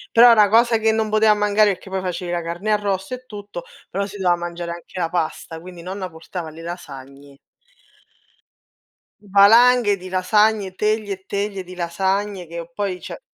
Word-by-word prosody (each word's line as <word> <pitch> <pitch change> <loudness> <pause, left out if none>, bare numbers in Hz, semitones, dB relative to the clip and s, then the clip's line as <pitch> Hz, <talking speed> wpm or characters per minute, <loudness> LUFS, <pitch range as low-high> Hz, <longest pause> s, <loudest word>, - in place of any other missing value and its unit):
Però 235 +1 +9
è - - +8
una 210 -3 +5
cosa 230 +2 +4
che 220 0 +2
non 220 -1 0
poteva 215 0 +4
mancare 210 0 +3
perché 190 - -14
poi 190 0 -2
facevi 180 -1 -4
la 175 - -1
carne 170 +5 -4
arrosto 205 +1 -1
e 255 0 -10
tutto, 205 -5 -8 0.3
però 200 +2 -2
si 205 +1 -10
doveva 180 -3 +2
mangiare 175 0 -5
anche 170 +2 -10
la 170 -2 0
pasta, 165 -1 -3
quindi 175 0 -11
nonna 185 +1 -5
portava 160 +1 -8
le 160 +1 -12
lasagne. 140 -5 -10 1.9
Valanghe 205 +2 +5
di 185 0 -10
lasagne, 195 +1 +1
teglie 210 -1 0
e 190 0 -18
teglie 200 -1 -3
di 180 +1 -11
lasagne 190 +2 -2
che 170 +1 -8
poi, 190 -1 -3
cioè - - -8
190 Hz, 175 wpm, -21 LUFS, 175-210 Hz, 1.9 s, Però